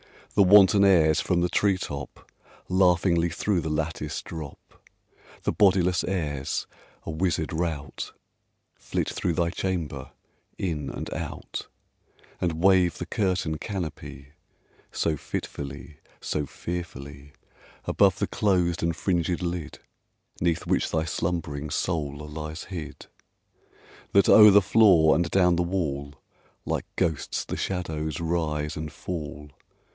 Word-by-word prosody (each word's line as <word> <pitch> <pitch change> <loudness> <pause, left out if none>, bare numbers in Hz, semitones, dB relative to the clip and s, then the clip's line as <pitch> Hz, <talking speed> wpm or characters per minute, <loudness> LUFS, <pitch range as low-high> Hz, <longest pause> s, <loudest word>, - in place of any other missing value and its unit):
The 100 - +4
wanton 100 0 +7
airs, 80 -6 +5
from 90 -2 +1
the 90 - +1
tree 100 0 +2
top, 70 -6 -7 0.4
Laughingly 90 -2 +3
through 90 +3 0
the 80 - -3
lattice 75 -1 -3
drop 80 -4 -10 0.6
The - - +1
bodiless 90 -3 +3
airs, 75 -7 -2 0.4
a - - -3
wizard 80 -1 -1
rout, 80 -5 -3 0.6
Flit - - -3
through 85 - -1
thy 85 -1 0
chamber 85 -8 -3 0.5
in 75 -7 -2
and - - -6
out, - - -6 0.7
And 85 -2 -2
wave 95 -3 +4
the 90 - -4
curtain 90 -5 -1
canopy 80 -8 -6 0.6
So 80 -2 0
fitfully 70 +2 -6 0.2
so 75 -2 -2
fearfully 70 -5 -7 0.5
Above - - +3
the - - 0
closed 90 -4 +1
and 85 -1 0
fringed 85 0 0
lid 85 -3 -4 0.6
'Neath 85 -1 0
which - - +1
thy 80 - 0
slumb'ring 75 -3 -3
soul 75 -2 -2
lies 75 +2 -6
hid, 85 -6 -7 1.1
That, 100 - +5
o'er 105 -1 +10
the 100 0 +7
floor 95 -6 +5
and 85 0 +1
down 90 -2 +3
the - - +2
wall, 75 -6 -2 0.5
Like - - -2
ghosts 80 -6 -1
the - - -4
shadows 80 -5 -3
rise 80 -3 -1
and 75 -1 -5
fall! 75 -4 -6
85 Hz, 125 wpm, -26 LUFS, 75-90 Hz, 1.1 s, o'er